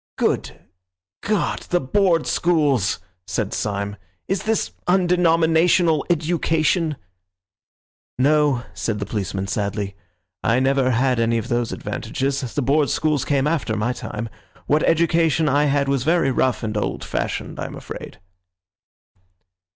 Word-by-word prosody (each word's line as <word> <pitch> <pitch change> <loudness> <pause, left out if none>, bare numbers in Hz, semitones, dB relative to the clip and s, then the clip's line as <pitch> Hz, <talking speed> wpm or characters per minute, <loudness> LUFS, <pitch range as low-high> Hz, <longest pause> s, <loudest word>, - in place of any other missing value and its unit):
"Good - - -1 0.6
God, 210 0 0
the 175 - +2
Board 170 +2 +2
Schools!" 145 - +2 0.3
said 95 +2 -2
Syme. 100 0 -2 0.3
"Is 195 -1 -1
this 220 -1 0 0.2
undenominational 170 -2 +3
education?" 165 -1 +1 1.2
"No," 145 -1 +3
said 110 -2 -2
the 100 - -3
policeman 95 -2 -3
sadly, 100 0 -3 0.5
"I 115 +2 +3
never 135 0 +2
had 125 0 +2
any 115 0 +2
of 115 +3 -4
those 120 -2 0
advantages. 135 +1 -3 0.2
The 145 - 0
Board 140 +3 +2
Schools 155 -4 +1
came 140 0 +1
after 150 -8 0
my 115 +4 0
time. 115 -1 -5 0.4
What 150 +2 +2
education 165 -1 +2
I 145 +1 +3
had 140 -1 +1
was 135 -2 +1
very 160 -2 +2
rough 130 -1 0
and 110 -1 -3
old 105 - -2
fashioned, - - -3
I - - -3
am - - -9
afraid." - - -9
140 Hz, 130 wpm, -22 LUFS, 115-165 Hz, 1.2 s, undenominational